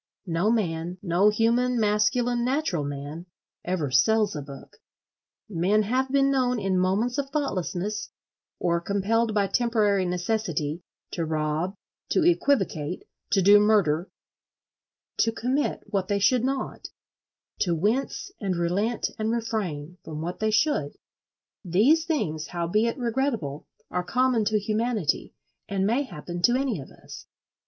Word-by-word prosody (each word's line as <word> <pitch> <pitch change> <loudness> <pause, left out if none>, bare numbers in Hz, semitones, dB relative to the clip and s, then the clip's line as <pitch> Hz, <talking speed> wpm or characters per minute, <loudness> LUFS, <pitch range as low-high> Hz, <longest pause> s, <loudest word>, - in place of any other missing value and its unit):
No 175 +3 +1
man—no 180 -1 +1
human, 235 +3 +2
masculine, 225 +3 +2
natural 255 - 0
man—ever 150 +2 -5
sells 205 - +3
a 150 - -3
book. 140 -1 -11 0.7
Men 200 +3 +2
have 260 +5 0
been 275 0 +3
known 250 -2 +1
in 195 -2 +1
moments 210 +9 +1
of 275 -1 -2
thoughtlessness, 210 - -2 0.5
or 170 -1 0
compelled 215 +4 0
by 205 -1 +3
temporary 210 -3 +1
necessity, 175 -4 -2 0.3
to 170 - -2
rob, 155 +4 -1 0.3
to - - +2
equivocate, 195 - +1 0.3
to 195 -2 +2
do 205 +2 +8
murder, 200 -6 +2 1.1
to 225 - +3
commit 255 +6 -1
what 195 -3 -2
they 205 - +1
should 220 +5 +3
not, 265 +1 -3 0.7
to 175 -3 +1
"wince 235 - -1
and 190 -3 -1
relent 190 +7 0
and 215 0 0
refrain" 185 -9 -3
from 155 -1 -6
what 170 +3 -4
they 220 - +1
should: 215 - +1 0.7
these 235 - +3
things, 160 - -1
howbeit 210 +8 0
regrettable, 235 - -2 0.2
are 180 - -1
common 250 +2 +1
to 215 +1 +2
humanity, 215 -3 -1 0.3
and 195 -1 0
may 235 +7 +2
happen 175 - -6
to 240 +7 +4
any 255 - 0
of 135 - -9
us. - - -12
205 Hz, 130 wpm, -26 LUFS, 175-235 Hz, 1.1 s, do